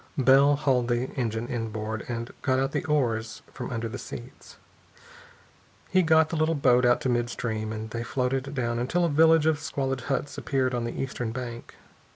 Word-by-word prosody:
Bell 135 Hz, +2 st, +5 dB
hauled 130 Hz, -4 st, +1 dB
the 120 Hz, +1 st, -1 dB
engine 115 Hz, -2 st, -2 dB
inboard 110 Hz, -2 st, -4 dB
and 115 Hz, -1 st, -4 dB
got 130 Hz, -1 st, +1 dB
out 135 Hz, +1 st, 0 dB
the -, -, -1 dB
oars 115 Hz, -7 st, -1 dB
from 125 Hz, -, -6 dB
under 115 Hz, -2 st, -3 dB
the 110 Hz, -, -6 dB
seats. 120 Hz, +2 st, -10 dB, 1.3 s
He 185 Hz, -, +5 dB
got 160 Hz, -2 st, +4 dB
the -, -, -3 dB
little 160 Hz, +1 st, +1 dB
boat 125 Hz, -3 st, +4 dB
out 120 Hz, -, +3 dB
to -, -, -1 dB
mid 120 Hz, -1 st, +1 dB
stream, 110 Hz, -3 st, -3 dB
and 110 Hz, 0 st, -6 dB
they 115 Hz, -, -3 dB
floated 130 Hz, +2 st, -1 dB
down 120 Hz, -2 st, -1 dB
until 170 Hz, +9 st, +1 dB
a -, -, +1 dB
village 160 Hz, +1 st, +5 dB
of 160 Hz, -1 st, +2 dB
squalid 135 Hz, -3 st, -2 dB
huts 140 Hz, +1 st, -2 dB
appeared 130 Hz, -2 st, 0 dB
on 120 Hz, -1 st, -1 dB
the 120 Hz, -, -5 dB
eastern 125 Hz, -3 st, -3 dB
bank. 120 Hz, -1 st, -7 dB
125 Hz, 190 wpm, -27 LUFS, 120-140 Hz, 1.3 s, Bell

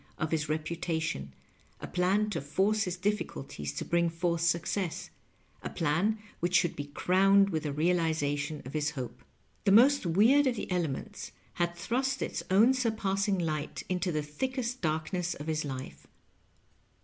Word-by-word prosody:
of 155 Hz, -, -2 dB
his 155 Hz, -2 st, 0 dB
Tepatation, 160 Hz, -, -2 dB, 0.5 s
a -, -, -6 dB
plan 190 Hz, +4 st, +1 dB
to 165 Hz, -, -2 dB
force 195 Hz, +9 st, +1 dB
bis 180 Hz, -1 st, -3 dB
difficnlties 75 Hz, -, -3 dB
to -, -, -3 dB
bring 170 Hz, 0 st, +2 dB
f 165 Hz, 0 st, -7 dB
ortb 170 Hz, -2 st, +1 dB
success 170 Hz, +2 st, -1 dB, 0.2 s
— -, -, -35 dB
a -, -, -4 dB
pLin 170 Hz, +8 st, +1 dB, 0.2 s
wbicb 175 Hz, -1 st, +3 dB
sbonld -, -, -17 dB
be 145 Hz, -, -4 dB
crowned 195 Hz, +6 st, +4 dB
with 160 Hz, -2 st, -1 dB
the 150 Hz, -, -3 dB
realization 155 Hz, -2 st, 0 dB
of 130 Hz, -, -7 dB
bis 150 Hz, 0 st, -1 dB
bope. 130 Hz, -4 st, -6 dB, 0.4 s
Tbe 195 Hz, -, +4 dB
most 265 Hz, -1 st, +6 dB
weird 235 Hz, -, +5 dB
of 250 Hz, -, +1 dB
tbe 210 Hz, -, -5 dB
elements 165 Hz, -7 st, -3 dB, 0.3 s
bad 175 Hz, 0 st, +1 dB
tbrost 260 Hz, +9 st, -1 dB
its -, -, -3 dB
own 215 Hz, +7 st, +6 dB
surpassing 205 Hz, -5 st, 0 dB
ligbt 155 Hz, -4 st, -3 dB
into 180 Hz, 0 st, 0 dB
tbe 150 Hz, -2 st, -2 dB
thickest 255 Hz, -, -3 dB
dark 155 Hz, +1 st, -1 dB
ness 180 Hz, -1 st, -1 dB
of 145 Hz, -, -8 dB
bis 155 Hz, -1 st, -1 dB
life. 130 Hz, -2 st, -7 dB
170 Hz, 165 wpm, -30 LUFS, 155-200 Hz, 0.5 s, most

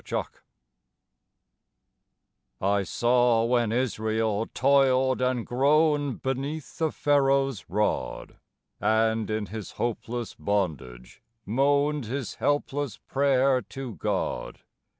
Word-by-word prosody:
VISIONS -, -, -2 dB, 2.3 s
I 100 Hz, +1 st, +1 dB
saw 120 Hz, +4 st, +2 dB
when 120 Hz, -2 st, +1 dB
Israel 110 Hz, -3 st, 0 dB
toiled 130 Hz, -1 st, +3 dB
and 125 Hz, -2 st, 0 dB
groaned 145 Hz, +1 st, +2 dB
beneath 135 Hz, +3 st, -4 dB
the 160 Hz, -2 st, +1 dB
Pharoah's 135 Hz, -, +1 dB
rod, 105 Hz, +4 st, -2 dB, 0.4 s
And 110 Hz, +1 st, +1 dB
in 110 Hz, -1 st, -1 dB
his 105 Hz, +1 st, -7 dB
hopeless 120 Hz, 0 st, -3 dB
bondage 75 Hz, -12 st, -3 dB, 0.2 s
moaned 140 Hz, +4 st, +1 dB
his 130 Hz, +1 st, -4 dB
helpless 145 Hz, -2 st, -1 dB
prayer 135 Hz, -1 st, +2 dB
to 135 Hz, -3 st, -7 dB
God. -, -, -3 dB
125 Hz, 90 wpm, -26 LUFS, 110-140 Hz, 2.3 s, toiled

